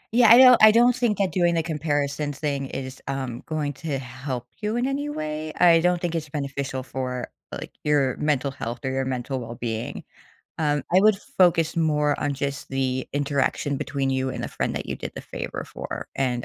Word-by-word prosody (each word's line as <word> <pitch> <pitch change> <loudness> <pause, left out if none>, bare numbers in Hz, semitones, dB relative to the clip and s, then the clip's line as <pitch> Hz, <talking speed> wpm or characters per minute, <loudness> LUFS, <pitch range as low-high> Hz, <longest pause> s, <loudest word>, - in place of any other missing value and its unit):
Yeah, 240 -3 +7
I 235 - +10
do 255 -1 +9
I 215 0 +10
don't 240 +2 +5
think 230 -5 +1
that 195 -2 +1
doing 175 -2 +2
the 165 - +1
comparison 145 -2 -1
thing 140 -1 -2
is, 130 0 -6
um, 130 -3 -3
going 150 -2 -2
to 145 0 -3
help 130 0 -5 0.2
you 210 +1 -1
in 245 +1 +1
any 285 +2 -2
way? 155 - -4
I 170 -2 +7
don't 180 +1 +2
think 170 -1 -2
it's 155 -3 -3
beneficial 140 -2 -3
for, 130 -1 -4 0.2
like, - - -6
your 145 -3 +2
mental 140 -2 0
health 120 -2 -5
or 130 - 0
your 135 0 -1
mental 130 +1 -3
well-being. 115 -1 -5 0.6
Um, 145 -3 +1
I 185 - +7
would 215 +1 +6 0.2
focus 170 -3 +4
more 150 -2 +2
on, 145 -1 -1
just, 140 +1 -4
the 130 -1 -1
interaction 140 0 0
between 140 -1 -2
you 130 0 0
and - - -5
the - - -3
friend - - -2
that - - -4
you - - -4
did - - -6
the - - -6
favor - - -6
for, - - -7
and, 125 -3 0
145 Hz, 200 wpm, -24 LUFS, 130-165 Hz, 0.6 s, I